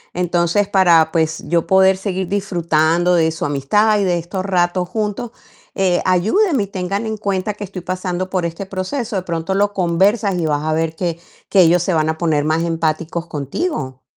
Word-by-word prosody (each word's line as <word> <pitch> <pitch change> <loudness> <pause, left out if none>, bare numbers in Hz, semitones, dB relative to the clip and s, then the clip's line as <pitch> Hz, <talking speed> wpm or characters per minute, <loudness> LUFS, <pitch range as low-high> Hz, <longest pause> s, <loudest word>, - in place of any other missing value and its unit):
Entonces, 175 +3 +1
para, 170 -5 +4
pues, 160 -1 0
yo 170 -1 +1
poder 190 0 +5
seguir 190 -2 -3
disfrutando 175 -3 +1
de 160 -2 +3
su 160 - -4
amistad 205 +10 +2
y - - +1
de 175 -1 +1
estos 185 +3 -4
ratos 180 -1 0
juntos, 215 +3 -3 0.5
eh, 185 -2 +1
ayúdenme 220 - +2
y - - -6
tengan 195 +3 -3
en 220 0 -2
cuenta 200 0 -2
que 210 - -8
estoy 190 -2 -7
pasando 185 0 -3
por 180 -3 0
este 170 +4 -7
proceso". 205 +5 -4
De - - -1
pronto 170 +1 -3
lo 205 +1 +1
conversas 195 +3 +1
y 165 - -1
vas 145 0 -1
a 155 0 0
ver 160 0 -1
que 170 -2 -3 0.3
que 195 - +5
ellos 175 +1 +4
se 185 - 0
van 155 0 +1
a 160 - -2
poner 155 -4 +1
más 160 +2 +1
empáticos 165 0 -2
contigo. 140 - -4
180 Hz, 190 wpm, -18 LUFS, 165-195 Hz, 0.5 s, poder